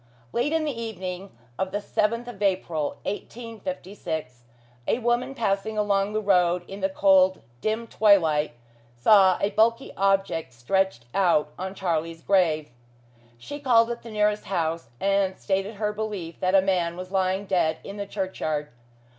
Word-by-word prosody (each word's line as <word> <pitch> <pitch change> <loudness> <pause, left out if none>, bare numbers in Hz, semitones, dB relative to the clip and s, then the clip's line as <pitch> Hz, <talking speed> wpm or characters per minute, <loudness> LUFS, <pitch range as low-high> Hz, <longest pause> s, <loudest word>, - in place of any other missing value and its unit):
Late 245 +5 +1
in 320 -1 +1
the 300 - 0
evening 195 -4 -5 0.3
of 190 - 0
the 205 - -1
seventh 225 +3 -1
of 225 -5 -9
April, 175 -6 0
1856, 190 - -6 0.4
a - - +2
woman 245 +2 0
passing 215 -2 -1
along 200 -1 +1
the 215 - +1
road 180 -3 +3
in 195 - -8
the 190 0 0
cold, 190 -1 +4 0.2
dim 220 +2 -1
twilight, 165 - +3 0.4
saw 190 - +6
a 200 - 0
bulky 230 +4 +2
object 195 -7 +1
stretched 125 +2 0
out 170 -6 +2
on 190 +1 -4
Charlie's 165 -3 -2
grave. 160 -7 +2 0.7
She 290 - -8
called 240 -4 +4
at 235 - -5
the 230 - -10
nearest 210 -1 +1
house, 165 -7 -2
and 195 -1 +1
stated 195 +2 -1
her 210 0 -1
belief 205 -6 -5
that 185 +1 +2
a 190 - +6
man 175 -3 0
was 185 +1 -7
lying 190 0 0
dead 175 -5 +1
in 200 - -8
the 200 0 -4
churchyard. 155 -7 -3
195 Hz, 155 wpm, -25 LUFS, 180-210 Hz, 0.7 s, saw